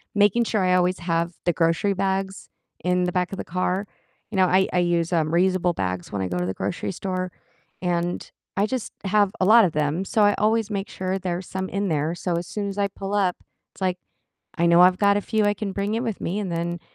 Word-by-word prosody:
making 205 +3 +4
sure 215 -3 0
I 185 - +3
always 180 0 +2
have 170 0 -1
the 175 - +3
grocery 165 +5 +1
bags 195 0 -2 0.3
in 180 0 +2
the 180 - -1
back 180 0 0
of - - -4
the - - -4
car 185 +3 -1 0.4
you - - -5
know, 185 - +5
I 190 +1 +3
I 180 - +3
use, 175 0 +1
um, 155 -2 +2
reusable 180 0 +2
bags 90 -1 -3
when 100 -2 -2
I 95 - -1
go 90 - -2
to 90 - -1
the 95 - -2
grocery 180 - -3
store 185 0 -3 0.5
and 175 -1 -1 0.3
I 200 - +3
just 255 -2 -3
have 200 0 +3
a 185 - +4
lot 225 +2 +7
of 175 - 0
them, 150 +4 0
so 215 +2 +2
I 205 0 +5
always 220 0 +1
make 200 0 -3
sure 185 +1 -2
there's 180 -1 -3
some 190 0 -4
in 200 +1 -1
there, 155 +1 0
so 175 -1 -2
as 170 - -3
soon 205 -1 -3
as 195 - -7
I 200 - +2
pull 195 +1 -6
up, 190 -3 +1 0.4
it's - - -18
like 185 -1 0 0.6
I 170 - +2
know 170 +1 +6
I've 180 0 +6
got 200 0 +4
a - - -1
few 220 +1 0
I 205 - +3
can 200 0 -4
bring 200 +2 -2
in 230 - -1
with 225 -5 -3
me, 190 +5 -2
and 200 -3 -3
then, 170 +1 -2
185 Hz, 245 wpm, -24 LUFS, 175-200 Hz, 0.6 s, lot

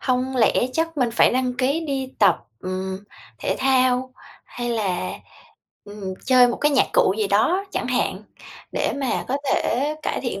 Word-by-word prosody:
hông 255 0 -1
lẽ 230 - +4 0.2
chắc 325 +1 -1
mình 250 -4 +1
phải 230 - +4
đăng 255 0 0
ký 275 +6 0
đi 270 -4 -4
tập, 195 -5 +5 0.2
ừm, 190 +1 -4 0.4
thể - - -1
thao 255 -1 +2 0.3
hay 240 0 -5
là, 190 - -1 0.7
ừm, 205 -2 -7
chơi 250 -1 +6
một - - -2
cái 295 - +2
nhạc 275 - +4
cụ 185 - +3
gì 215 - +1
đó 275 - +2
chẳng - - -2
hạn, - - -1 0.5
để - - 0
mà 270 -3 -1
có 270 - 0 0.2
thể 280 +6 0
cải - - -2
thiện 240 -6 -4
250 Hz, 175 wpm, -22 LUFS, 210-265 Hz, 0.7 s, chơi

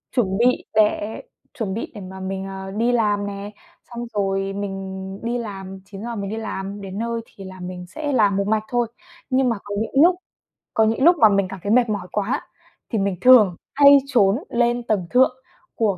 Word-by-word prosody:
chuẩn 195 -6 +1
bị 250 +2 +2
để 215 0 +1 0.3
chuẩn 220 -8 -3
bị 225 - -5
để 205 - -7
mà 190 +1 -9
mình, 190 0 -4
ờ, 190 0 -7
đi 230 +4 +1
làm 210 -4 +1
nè, 200 +1 -6 0.4
xong 240 0 -6
rồi 195 -1 -1
mình 195 -1 -5
đi 240 +1 -1
làm, 195 -4 -7
9:00 210 +4 -7
mình 200 -2 -4
đi 220 - -3
làm, 200 -2 -5
đến 195 0 -7
nơi 230 0 -2
thì 195 - -13
là 185 0 -10
mình 180 0 -7
sẽ 295 - -4
làm 205 -6 +3
một 200 0 0
mạch 215 0 +1
thôi. 240 -1 0 0.4
Nhưng 260 -1 +2
mà 230 - 0
có 205 - -5
những 270 +7 +3
lúc 360 +1 +5 0.6
có 220 - +3
những 225 +4 +1
lúc 345 +2 +7
mà 220 -6 +7
mình 200 -2 +2
cảm 195 - -7
thấy 205 - -1
mệt 240 -1 +4
mỏi 200 -4 -3
quá 210 +4 -2 0.4
thì 225 - -1
mình 195 -1 0
thường 220 -8 +7 0.2
hay 280 0 +8
trốn 210 -7 +3
lên 240 0 +1
tầng 205 -6 -1
thượng 255 +1 +4 0.4
của 205 -5 +1
205 Hz, 205 wpm, -22 LUFS, 195-235 Hz, 0.6 s, hay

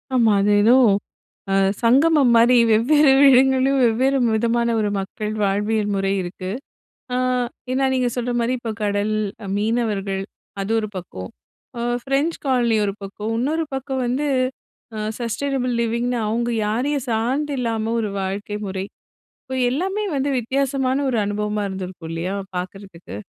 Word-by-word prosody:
ஆமா, 230 -4 +4
அது 205 - +2
ஏதோ 230 +4 +6 0.8
அ - - +2 0.3
சங்கமம் 275 +2 +4
மாரி, 240 +2 +6
வெவ்வேறு 270 +6 +5 0.2
இடங்கள்லயும் 265 +1 +4
வெவ்வேறு 260 +4 +2 0.2
விதமான 235 +1 +1
ஒரு 210 - 0
மக்கள், 210 +2 -4
வாழ்வியல் 205 +1 0
முறை 195 0 0
இருக்கு. 185 +1 -6 0.6
அ - - +1 0.6
ஏன்னா, 270 +1 +1
நீங்க 250 -1 +1
சொல்ற 245 0 -1
மாரி 235 +2 0
இப்ப 230 -2 -4
கடல், 205 +1 0 0.4
மீனவர்கள் 205 -3 -1 0.4
அது 210 +3 -2
ஒரு 215 -1 -2
பக்கம். 95 - -7 0.5
அ - - -3 0.2
ஃப்ரெஞ்ச் 275 +5 0
காலனி 240 -4 +2
ஒரு 200 - -2
பக்கம், 210 +3 -5
இன்னொரு 310 +6 0
பக்கம் 265 0 -3
வந்து 265 +5 -1 0.7
அ - - -4 0.2
சஸ்டெய்னபிள் 255 +2 -1
லிவிங்ன்னு 235 +1 -1
அவங்க 235 +2 -1 0.2
யாரையும் 255 +5 -1
சார்ந்து 260 +7 0
இல்லாம 225 -2 -1
ஒரு 215 - -2
வாழ்க்கை 200 +2 -4
முறை. 190 0 -3 0.6
இப்ப 260 -1 -5
எல்லாமே 385 +9 -1
வந்து 275 +1 0
வித்தியாசமான 265 +2 0
ஒரு 245 - 0
அனுபவமா 210 +1 -2
இருந்திருக்கும் 185 -3 -7
இல்லையா. 175 +4 -3 0.2
பார்க்கறதுக்கு? 180 - -7
230 Hz, 135 wpm, -21 LUFS, 205-260 Hz, 0.8 s, ஏதோ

